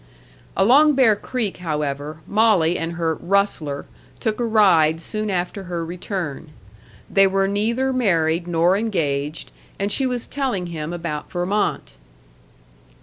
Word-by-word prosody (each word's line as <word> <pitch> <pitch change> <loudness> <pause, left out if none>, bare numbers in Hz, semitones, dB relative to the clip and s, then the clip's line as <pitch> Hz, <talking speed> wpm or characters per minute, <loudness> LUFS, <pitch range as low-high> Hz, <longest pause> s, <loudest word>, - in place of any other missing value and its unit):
Along 275 +9 +5
Bear 245 -5 +5
Creek, 220 -1 -3
however, 150 -2 -3
Molly 200 -6 +3
and 165 0 -3
her 165 -1 0
"rustler" 170 -6 -1 0.3
took 220 -1 -1
a - - 0
ride 185 -9 +4
soon 215 +5 -4
after 185 +1 -2
her 170 -2 -3
return. 175 -3 -5 0.6
They 195 0 +4
were 195 0 +1
neither 235 +6 0
married 170 -8 +1
nor 175 +2 +3
engaged, 155 -8 -2 0.3
and 200 +1 -1
she 265 +3 +2
was 245 -2 -3
telling 260 -10 -2
him 155 0 -4
about 170 -4 -5
Vermont. 185 +4 -1
185 Hz, 130 wpm, -21 LUFS, 165-215 Hz, 0.6 s, Along